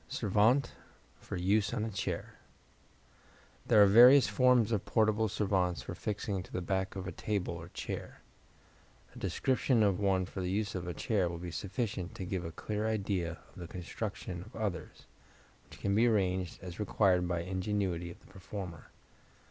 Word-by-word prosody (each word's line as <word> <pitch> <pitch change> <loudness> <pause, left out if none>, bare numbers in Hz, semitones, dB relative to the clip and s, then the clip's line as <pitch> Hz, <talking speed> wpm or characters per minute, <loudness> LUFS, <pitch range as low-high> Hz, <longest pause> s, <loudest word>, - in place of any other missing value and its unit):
Servante 110 +7 +2 0.5
for - - -6
Use 100 +4 +1
on 110 - -1
a 110 - -4
Chair 100 0 -4 1.3
There 105 - +7
are - - +8
various 125 +7 +8
forms 125 -3 +4
of 105 -4 0
portable 110 0 +2
servantes 95 - 0
for - - -6
fixing 105 -2 -3
to - - -13
the - - -2
back 95 +1 -2
of 95 -1 -5
a 90 - -4
table 100 -5 -2
or 85 0 -8
chair. - - -6 0.9
A - - -9
description 130 -3 +1
of 100 -2 +2
one 95 -2 +2
for 95 +1 -6
use 95 +3 -1
on 90 -1 -4
a 90 - -4
chair 95 -3 0
will 85 - -5
be 85 0 -6
sufficient 100 -1 -3
to 95 - -5
give 90 -1 -3
a 80 - -5
clear 105 +5 -3
idea 95 -6 -1 0.2
of - - -18
the 85 - -6
construction 90 0 -5
of 110 +6 -13
others, 105 -5 -4 0.6
which - - -13
can 100 - 0
be 115 +4 +4
arranged 95 -5 0
as 90 0 -8
required 95 -3 +2
by 85 -1 -1
the 90 - -8
ingenuity 95 -3 -1
of 85 - -11
the - - -23
performer. 95 -2 -8
95 Hz, 175 wpm, -32 LUFS, 90-105 Hz, 1.3 s, are